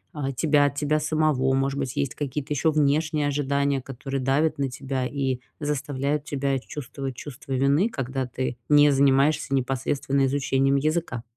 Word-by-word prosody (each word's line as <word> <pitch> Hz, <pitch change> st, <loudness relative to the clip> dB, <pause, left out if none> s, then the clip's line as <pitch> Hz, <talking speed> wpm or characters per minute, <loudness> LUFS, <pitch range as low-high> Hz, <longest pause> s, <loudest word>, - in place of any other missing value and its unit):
э, 135 Hz, -2 st, -2 dB
тебя 145 Hz, -1 st, +4 dB
от 140 Hz, -, -1 dB
тебя 150 Hz, +1 st, +1 dB
самого. 150 Hz, -4 st, +1 dB
Может 135 Hz, +1 st, 0 dB
быть, 135 Hz, -1 st, -3 dB
есть 140 Hz, -2 st, -1 dB
какие-то 145 Hz, 0 st, -3 dB
ещё 155 Hz, +3 st, +2 dB
внешние 150 Hz, 0 st, +1 dB
ожидания, 140 Hz, -1 st, 0 dB
которые 135 Hz, +1 st, -5 dB
давят 145 Hz, +5 st, +1 dB
на 140 Hz, -1 st, -1 dB
тебя 135 Hz, -1 st, -3 dB
и 135 Hz, -2 st, -2 dB, 0.2 s
заставляют 145 Hz, 0 st, -2 dB
тебя 140 Hz, -2 st, -1 dB
чувствовать 135 Hz, -1 st, -6 dB
чувство 140 Hz, -1 st, -9 dB
вины, 140 Hz, -, +2 dB
когда 135 Hz, -, -3 dB
ты 125 Hz, 0 st, -4 dB
не 145 Hz, 0 st, +6 dB
занимаешься 140 Hz, +1 st, +3 dB
непосредственно 135 Hz, +1 st, 0 dB
изучением 135 Hz, 0 st, +1 dB
языка? 155 Hz, -5 st, -1 dB
140 Hz, 155 wpm, -25 LUFS, 135-145 Hz, 0.2 s, не